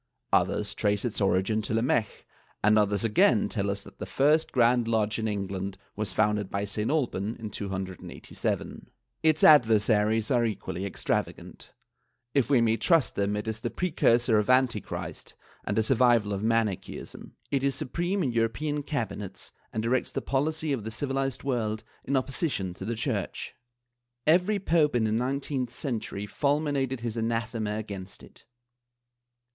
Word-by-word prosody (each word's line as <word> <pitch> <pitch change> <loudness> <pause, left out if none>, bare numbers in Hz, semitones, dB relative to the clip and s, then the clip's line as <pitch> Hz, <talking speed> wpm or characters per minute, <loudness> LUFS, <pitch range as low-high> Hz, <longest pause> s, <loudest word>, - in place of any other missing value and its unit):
Others - - +2
trace 105 +1 0
its 115 -3 -2
origin 100 +3 +2
to 110 - -2
Lamech 115 -2 0 0.4
and 105 +1 +5
others 100 -1 +1
again 110 0 +4
tell 100 -3 -2
us 100 0 -3
that 100 0 -15
the - - -5
first 150 +4 +2
Grand 120 -1 +3
Lodge 110 -1 +1
in 110 - -1
England 100 -2 -3 0.2
was 105 -1 -3
founded 105 -2 +1
by 100 +1 -2
St. 105 +2 -2
Alban 120 -8 -1
in 110 -2 -7
287. 95 -2 -5 0.3
Its 155 -1 +3
adversaries 110 -5 +5
are 120 -2 +3
equally 100 -3 -3
extrava - - -1
gant; - - -12 0.6
if 140 -3 +2
we 135 -4 +4
may 115 -1 +2
trust 155 - +3
them 100 +1 0
it 105 +2 -4
is 110 0 -3
the - - -2
precursor 120 -10 +2
of 105 - -2
Antichrist 125 -4 0 0.3
and - - -2
a 110 - +4
survival 120 -3 +3
of 100 - -3
Manicheism; 110 -3 -2 0.2
it 135 -1 +1
is 140 -1 +1
supreme 175 +8 -1
in 130 - 0
European 120 +6 0
cabinets 115 -9 -5 0.2
and 110 - -2
directs 125 +2 0
the - - -2
policy 155 +2 -1
of 120 -6 -3
the 110 - -4
civilized 135 +2 -2
world 110 -5 -1 0.2
in 140 +1 +1
opposition 130 - -2
to 95 - -8
the 115 +2 -2
Church. 110 -5 -3 0.7
Every 180 +6 +4
pope 165 -7 +2
in 120 - +2
the 110 - +1
nineteenth 130 +2 -1
century 110 -6 -3
fulminated 140 0 0
his 115 -1 -3
anathema 115 -2 -1
against 100 -3 -7
it. - - -17
115 Hz, 155 wpm, -28 LUFS, 105-135 Hz, 0.7 s, and